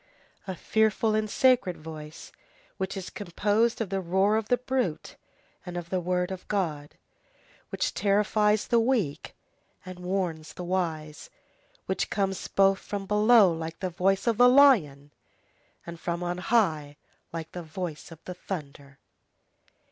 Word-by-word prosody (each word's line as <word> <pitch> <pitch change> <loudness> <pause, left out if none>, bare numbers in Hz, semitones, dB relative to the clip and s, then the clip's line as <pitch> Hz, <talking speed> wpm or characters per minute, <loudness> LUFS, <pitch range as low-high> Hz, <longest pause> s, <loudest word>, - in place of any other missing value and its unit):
A 190 - -4
fearful 220 +3 +1
and 215 0 0
sacred 250 -7 +3
voice 155 -1 -10 0.5
which 190 0 -3
is 190 - -6
composed 205 +4 0
of 215 - -2
the 195 0 -1
roar 190 +4 +2
of 220 -1 -1
the 245 - +4
brute 250 -10 -2 0.5
and 180 -2 -6
of 170 -1 -7
the 185 - +1
word 180 +1 -1
of 185 -1 -7
God, 155 -8 -2 0.7
which - - -2
terrifies 210 +1 +2
the 235 - +3
weak 225 - -1 0.5
and 185 -1 -9
which 180 - -10
warns 175 -5 -2
the 180 - -7
wise, 160 -4 -3 0.6
which - - -2
comes 195 -2 -2
both 195 0 +3
from 200 -1 -5
below 210 -2 +5
like 165 0 -6
the 185 -2 -3
voice 195 +3 +1
of 230 -3 +1
the 245 +1 +7
lion, 175 - +4 0.7
and 170 -1 -8
from 170 +1 -3
on 175 0 -3
high 160 -9 +1 0.3
like 165 -1 -6
the 180 - -6
voice 160 -1 -6
of 165 -1 -14
the 180 - -6
thunder. 140 -6 -8
185 Hz, 150 wpm, -27 LUFS, 165-210 Hz, 0.7 s, the